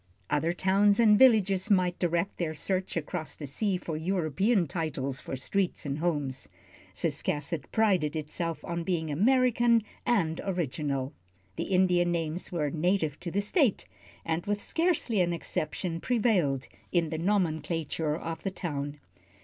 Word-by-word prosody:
Other 160 +3 +2
towns 200 +3 +3
and 215 -3 +7
villages 210 -5 +5
might 180 -3 +2
direct 170 +2 0
their 160 -3 -1
search 185 +3 -2
across 160 0 -4
the 150 - -7
sea 185 +8 -1
for 165 -3 -5
European 180 - +1
titles 140 -4 -3
for - - -5
streets 180 +6 -1
and 140 +1 -2
homes. 145 -6 -2 0.4
Ciscasset 145 0 -2
prided 185 -9 +2
itself 160 +2 -4
on 170 0 -3
being 165 -3 -1
American 235 - +3 0.2
and 180 -10 +1
original. 145 -7 -2 0.4
The - - -2
Indian 180 -2 +3
names 165 0 -2
were 150 -5 -1
native 165 -2 0
to 175 - -5
the 200 +4 0
State, 215 - +1 0.4
and 165 +1 -1
with 205 0 -1
scarcely 325 - +1
an 175 -1 +1
exception 165 +1 -3
prevailed 185 - +1 0.2
in 170 -3 +2
the 160 - -2
nomenclature 165 -4 0
of 165 -1 -5
the 195 - -1
town. 145 -6 -4
175 Hz, 140 wpm, -29 LUFS, 155-195 Hz, 0.4 s, and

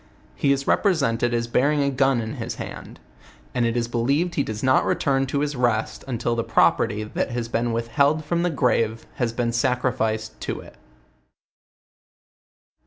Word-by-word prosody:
He 140 - +1
is 135 0 0
represented 135 - +2
as 120 0 0
bearing 140 +5 +2
a 140 - +1
gun 135 -2 +2
in 110 0 -5
his - - -4
hand; - - -8 0.5
and 120 -1 +1
it 115 +1 -1
is 120 -1 0
believed 140 +9 0
lie 140 - +2
does 110 -3 -5
not 130 0 +4
return 135 -1 +1
to 140 +1 -1
his 150 0 -1
rest, 120 -3 0
until 120 -2 -1
the 115 - -1
property, 105 -1 +2
that 105 - -2
has 120 -1 -3
been 115 0 -1
withheld 140 +7 +1
from 170 +2 0
the 175 - +1
grave 115 -6 0
has 120 -3 0
been 120 0 -1
sacrificed 120 -3 -1
to - - -3
it. - - -13
125 Hz, 170 wpm, -23 LUFS, 115-140 Hz, 0.5 s, not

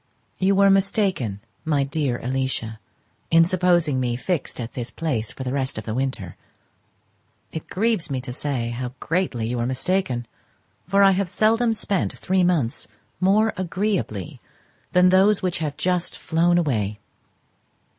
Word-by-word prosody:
You 195 +1 +3
were 200 0 +5
mistaken, 195 - +1 0.2
my 150 -3 +1
dear 135 -3 -1
Alicia, 125 -3 -2 0.5
in 165 0 +6
supposing 175 -5 +2
me 120 -2 0
fixed 155 +3 -2
at 115 -1 -5
this 120 -1 -4
place 125 -10 -2
for 130 - -7
the 130 0 -3
rest 135 -4 -1
of 110 - -4
the 110 - -4
winter: 125 -8 -3 1.2
it 160 - -6
grieves 215 -4 0
me 135 -2 -1
to 125 -1 -6
say 130 -4 -2
how 125 +1 -4
greatly 165 -9 -1
you 120 +2 -2
were 120 - 0
mistaken, 130 -2 -1 0.6
for 200 +2 +4
I 195 - +7
have 190 -1 0
seldom 225 +4 +2
spent 200 -3 -2
three 185 0 +1
months 160 -10 0 0.3
more 210 +4 +3
agreeably 185 - -2 0.5
than 180 0 +5
those 190 +2 +4
which 180 -2 0
have 150 -3 -3
just 180 -1 0
flown 175 +2 +2
away. 110 - 0
160 Hz, 150 wpm, -23 LUFS, 125-185 Hz, 1.2 s, I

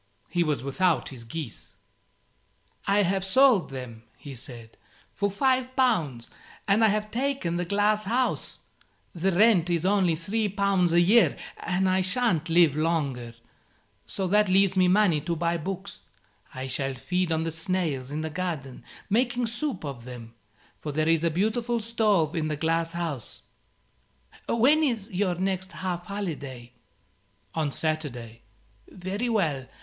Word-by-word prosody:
He 175 +1 +1
was 150 -6 -1
without 165 +5 +1
his 125 -4 -10
geese. 125 +1 -7 1.1
"I 200 +1 +4
have 190 +1 0
sold 220 - +4
them," 125 -4 -8 0.2
he 140 - -9
said, 115 -2 -8 0.4
"for 200 0 0
5 255 +4 +1
pounds; 165 - +1 0.4
and 205 +3 +4
I - - +7
have 215 0 -1
taken 255 -9 -1
the 175 - -1
glass 205 +3 +2
house. 250 +5 -1 0.6
The 185 +3 0
rent 185 -2 +4
is 170 0 0
only 190 -4 +3
3 205 +6 -1
pounds 195 -3 +2
a 170 - +5
year, 210 +7 +5 0.2
and 185 +1 0
I 185 0 +2
shan't 185 -4 +1
live 165 -3 +5
longer, 140 -7 -1 0.7
so 195 - -2
that 210 +2 +3
leaves 195 0 +4
me 185 -1 +4
money 180 -5 +3
to 170 +3 -2
buy 170 +1 0
books. 190 +4 -6 0.5
I 130 0 -6
shall 135 +1 -2
feed 180 +4 -1
on 160 0 +1
the 165 - -2
snails 160 -5 -2
in 150 +2 -3
the 160 0 -4
garden, 155 -7 -4 0.2
making 240 +3 +1
soup 240 - -3
of 130 -5 -7
them, 120 -2 -9 0.5
for 150 - -5
there 155 +2 0
is 165 -1 +3
a 170 - +3
beautiful 225 +7 0
stove 210 -8 +1
in 160 -2 0
the 150 -1 -2
glass 165 +2 0
house. 165 -8 -4 1.1
When 270 +7 +4
is 235 -8 -1
your 185 -1 0
next 190 +1 -2
half 180 -1 -4
holiday?" 145 - -5 0.8
"On 155 -3 -1
Saturday." 130 -8 -3 0.5
"Very 195 +6 -3
well. 155 - 0
175 Hz, 150 wpm, -26 LUFS, 155-205 Hz, 1.1 s, I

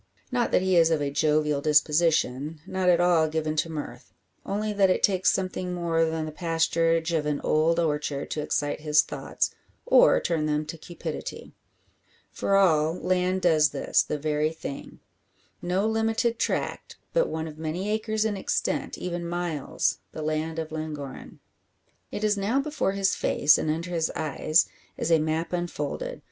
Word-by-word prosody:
Not 245 -2 +1
that - - +3
he 190 -1 +2
is 165 -1 +5
of 160 -2 +1
a 145 -1 -2
jovial 150 0 +1
disposition, 150 -1 +2
not 185 -1 0
at 175 -1 +4
all 175 -3 +4
given 155 0 -2
to 165 - +1
mirth; 135 -5 -7 0.3
only 210 +1 -2
that 200 -2 +3
it 185 - +1
takes 190 -2 +3
something 185 -1 -2
more 165 -2 +1
than 160 -1 -2
the 155 - -5
pasturage 165 0 +1
of 150 -2 0
an 150 -1 -1
old 165 +2 +2
orchard 150 -3 -1
to 155 - -2
excite 145 0 -1
his 150 0 +3
thoughts, - - -3 0.3
or - - +6
turn 160 -3 -1
them 150 0 0
to 155 +2 -7
cupidity. 175 +2 -7 0.8
For 195 - 0
all, 160 -5 +3
land 185 0 0
does 155 -4 +4
this - - +1
the 150 - -3
very 150 +1 0
thing. 160 -3 -8 0.6
No 180 +3 0
limited 225 +1 0
tract; - - -2 0.2
but - - +2
one 160 0 -3
of 155 0 -10
many 160 +5 -3
acres 220 0 0
in 215 -2 0
extent 190 - -2
even 175 -1 -4
miles 175 -5 -1
the 155 - -5
land 155 +1 -2
of 160 -1 -4
Llangorren. 155 -3 -7 0.7
It 210 - -4
is 210 -1 +3
now 220 +7 +1
before 290 -8 -1
his 195 -1 +1
face, 150 +1 +3
and 155 - -2
under 165 +3 -2
his 165 -2 0
eyes, 155 +1 +2 0.3
as 170 - -1
a 165 - +5
map 160 +3 -2
unfolded. 340 - -3
165 Hz, 170 wpm, -26 LUFS, 155-185 Hz, 0.8 s, or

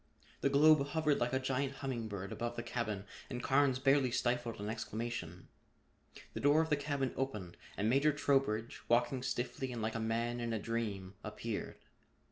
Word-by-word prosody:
The 140 - +2
globe 150 +1 +6
hovered 150 -1 +1
like 120 - +1
a 130 - +2
giant 130 +1 -1
humming 130 -5 -3
bird 100 -2 -5
above 120 0 -3
the 120 - -4
cabin 110 -4 -3 0.2
and 125 -1 -4
Carnes 135 -1 +3
barely 135 0 +4
stifled 120 -1 0
an 105 - -4
exclamation. 110 -5 -4 0.9
The - - -4
door 145 +2 +5
of 160 - -6
the - - +6
cabin 140 -2 -1
opened 105 -10 -3 0.2
and 105 - +1
Major 140 +6 +4
Trowbridge, 135 -6 +1
walking 120 +2 +2
stiffly 130 +1 -2
and 120 - -4
like 110 0 -1
a 115 - -2
man 115 +2 -1
in 120 -1 -2
a 110 - 0
dream, 105 -4 -3
appeared. 105 +1 -4
120 Hz, 175 wpm, -35 LUFS, 110-135 Hz, 0.9 s, globe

